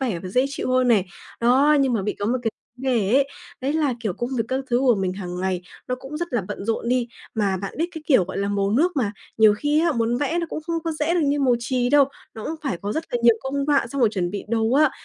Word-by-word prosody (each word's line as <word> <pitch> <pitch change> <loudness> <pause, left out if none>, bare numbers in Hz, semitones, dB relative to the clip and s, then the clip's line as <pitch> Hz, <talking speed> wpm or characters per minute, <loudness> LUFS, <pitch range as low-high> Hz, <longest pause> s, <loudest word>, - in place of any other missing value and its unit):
vẻ 235 -10 -1
và 185 - -5
dễ 250 +7 +2
chịu 275 -2 -3
hơn 255 -1 +3
này. 200 -5 +4 0.3
Đó, 270 +6 +5
nhưng 265 -2 +2
mà 210 -4 0
bị 210 - -1
có 205 - -2
một 250 +3 +1
cái 225 - 0 0.3
vấn 260 - -9
đề 210 -3 +1
ấy, 275 0 +4 0.3
đấy 270 +2 -1
là, 300 -5 +1
kiểu, 215 -5 -1
công 240 +7 -4
việc 230 - +1
các 265 +1 -1
thứ 240 - +3
của 255 -3 +4
mình 190 -3 -1
hàng 180 -2 -5
ngày 185 -1 -1 0.3
nó 250 - 0
cũng 270 +4 -8
rất 345 -1 -4
là 240 - +2
bận 205 - -5
rộn 230 +2 -1
đi. 245 -1 +1 0.3
Mà 200 -3 +1
bạn 195 +1 -6
biết 330 - +1
cái 320 -2 -7
kiểu, 255 - +5
gọi 190 - -5
là, 200 0 0
màu 200 0 0
nước 325 +8 +2
mà 220 -7 0 0.3
nhiều 215 -1 +7
khi 295 +8 +1
á, 335 -2 +2
muốn 230 -1 0
vẽ 305 +5 0
nó 335 - -1
cũng 310 - -4
không 335 - -1
có 325 - -1
dễ 310 +2 0
được 350 - +2
như 285 +1 +1
màu 255 -3 +4
chì 245 +1 0
đâu. 290 0 +6 0.3
Nó 220 - -7
cũng 320 - -3
phải 270 -10 -1
có 205 +1 -2
rất 320 - -2
là 245 - +1
nhiều 235 -1 +7
công 280 +1 -2
đoạn 280 -5 +2
trong 275 - -3
một 235 - +5
chuẩn 185 -5 -2
bị 200 - -5
dồ 225 0 +1
á. 295 +1 +5
245 Hz, 295 wpm, -23 LUFS, 210-280 Hz, 0.3 s, nhiều